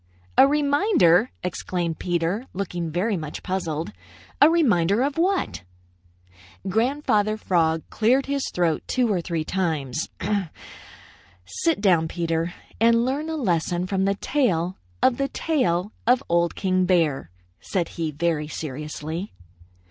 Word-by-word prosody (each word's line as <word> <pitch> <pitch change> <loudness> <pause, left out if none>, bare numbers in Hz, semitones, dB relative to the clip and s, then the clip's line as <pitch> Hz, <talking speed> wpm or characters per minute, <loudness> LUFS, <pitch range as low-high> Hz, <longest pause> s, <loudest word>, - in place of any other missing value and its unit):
"A 270 - +7
reminder!" 285 - +3
exclaimed 175 -2 -3
Peter, 175 +7 -1
looking 175 -3 -3
very 190 +7 0
much 155 -4 -6
puzzled. 170 -4 -3 0.5
"A 295 - +9
reminder 225 - +3
of 280 0 -1
what?" 365 - 0 1.1
Grandfather 215 -1 +1
Frog 165 -5 +1
cleared 250 +5 +2
his 280 -1 -2
throat 170 -3 0
two 245 -4 +1
or 180 - 0
three 165 -2 -2
times. 155 -6 -2 1.4
"Sit 305 - -1
down, 175 -6 +3
Peter, 165 0 -1 0.3
and 230 +1 +4
learn 285 +5 -2
a 320 - -2
lesson 175 - 0
from 190 0 0
the 200 0 +1
tale 190 - 0 0.2
of 250 -2 +4
the 275 - 0
tail 205 - 0 0.2
of 255 +2 +4
Old 170 0 +1
King 185 -1 +1
Bear," 160 - +1 0.3
said 175 -4 -2
he 165 -2 -3
very 155 0 -1
seriously. 155 +4 -5
185 Hz, 125 wpm, -24 LUFS, 165-245 Hz, 1.4 s, A